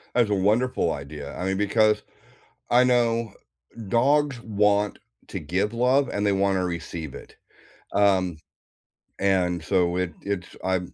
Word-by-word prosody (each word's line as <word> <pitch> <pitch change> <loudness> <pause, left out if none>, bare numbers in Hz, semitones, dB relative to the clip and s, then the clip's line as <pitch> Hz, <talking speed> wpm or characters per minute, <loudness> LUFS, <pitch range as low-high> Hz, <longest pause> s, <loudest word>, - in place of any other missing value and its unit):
That's 120 -4 +3
a - - +3
wonderful 110 +6 +1
idea, 70 0 -7
I - - -4
mean, 95 - 0
because 105 +2 +2 0.7
I 125 +1 +5
know 115 -2 +1 0.5
dogs 140 +3 +2
want 105 -2 +1 0.3
to - - -5
give 95 +8 -1
love, 130 +4 +2
and 100 0 -1
they 100 - +3
wanna 95 -1 +1
receive 85 -4 -5
it - - -12 0.6
um, 95 -4 +2 0.8
and 90 -3 +1
so, 90 -1 +1
it 90 -3 -2
it's 100 -3 -4
I 95 0 +1
100 Hz, 135 wpm, -25 LUFS, 90-115 Hz, 0.8 s, I